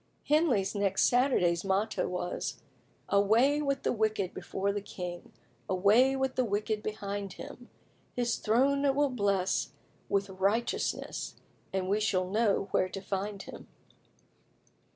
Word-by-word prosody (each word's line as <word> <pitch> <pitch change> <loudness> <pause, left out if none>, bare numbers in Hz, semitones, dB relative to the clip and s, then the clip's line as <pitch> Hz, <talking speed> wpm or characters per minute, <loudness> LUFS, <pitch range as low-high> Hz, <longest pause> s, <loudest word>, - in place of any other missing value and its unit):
Henley's 290 - +3
next 200 -2 +1
Saturday's 210 -10 +3
motto 195 +3 0
was 180 0 -3 0.5
"Away 230 +9 +3
with 275 -2 -1
the - - +1
wicked 215 -4 0
before 195 +2 -2
the 205 - -2
king, 180 -3 -7 0.4
Away 215 +8 +4
with 265 -1 0
the 255 - +1
wicked 210 0 -1
behind 205 -2 -4
him; 245 0 -10 0.5
His 240 -1 0
throne 270 +6 +2
it 275 -1 +3
will 285 -1 +2
bless 200 -5 0 0.4
With 200 0 +1
righteousness, 200 +5 -1 0.4
And 190 -1 -1
we 205 +3 +2
shall 185 -4 +1
know 205 0 +1
where 185 - +2
to 195 - -5
find 195 +1 -4
him." - - -11
205 Hz, 130 wpm, -30 LUFS, 195-245 Hz, 0.5 s, Away